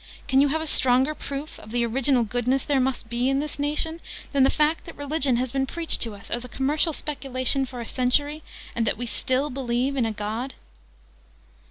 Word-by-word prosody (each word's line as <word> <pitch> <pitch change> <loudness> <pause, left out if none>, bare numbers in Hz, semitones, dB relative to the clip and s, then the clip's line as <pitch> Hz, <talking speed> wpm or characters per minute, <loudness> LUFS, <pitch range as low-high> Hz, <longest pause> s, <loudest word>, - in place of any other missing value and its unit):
"Can 265 -1 +4
you 285 - +5
have 315 +3 0
a - - -3
stronger 260 0 +3
proof 285 0 -6
of 215 - -12
the 235 +1 +1
Original 255 +1 +2
Goodness 245 +4 0
there 280 -2 +2
must 255 -2 -1
be 240 +3 0
in 270 - +2
this 295 0 -4
nation, 305 +3 0 0.3
than 280 - +2
the 265 - +6
fact 305 +2 +1
that 330 - -10
Religion 285 -2 +1
has 250 0 -1
been 270 0 0
preached 335 +3 +1
to 225 -3 -2
us, 200 +2 -14
as 240 - -2
a 250 - -9
commercial 295 +6 +1
speculation, 270 -3 0
for 250 -1 -8
a 235 - -4
century, 285 +6 +1 0.3
and 230 -2 0
that - - +1
we 245 - -3
still 260 +4 0
believe 255 +1 -1
in 245 -4 +1
a - - -1
God?" 220 +5 -4
265 Hz, 210 wpm, -25 LUFS, 245-285 Hz, 0.3 s, the